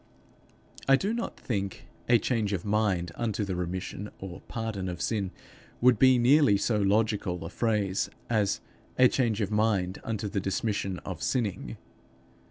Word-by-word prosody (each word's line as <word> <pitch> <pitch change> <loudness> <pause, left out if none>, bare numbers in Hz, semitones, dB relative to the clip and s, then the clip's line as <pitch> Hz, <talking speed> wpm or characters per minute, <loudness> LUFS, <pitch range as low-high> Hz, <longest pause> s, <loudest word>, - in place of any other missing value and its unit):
I 135 - +7
do 200 +10 -1
not 235 0 -4
think 100 -5 -3 0.2
a 120 - +7
change 110 -2 0
of 95 -1 -3
mind 100 -5 +1
unto 110 -1 -2
the 95 -2 -3
remission 90 +3 -4
or 95 -1 -8
pardon 110 -5 -3
of 90 -1 -5
sin 100 -2 -1 0.5
would 125 -2 +5
be 130 -1 +6
nearly 125 -2 +5
so 105 +2 +1
logical 100 -4 +1
a 85 - -6
phrase 105 -4 0 0.2
as 105 -4 +1 0.4
_a 130 -1 +6
change 115 -4 +1
of 100 0 -1
mind 105 -4 +1
unto 110 -2 -3
the 100 0 -1
dismission 95 -1 -1
of 90 -4 -5
sinning. 105 - -2
105 Hz, 155 wpm, -28 LUFS, 95-115 Hz, 0.5 s, I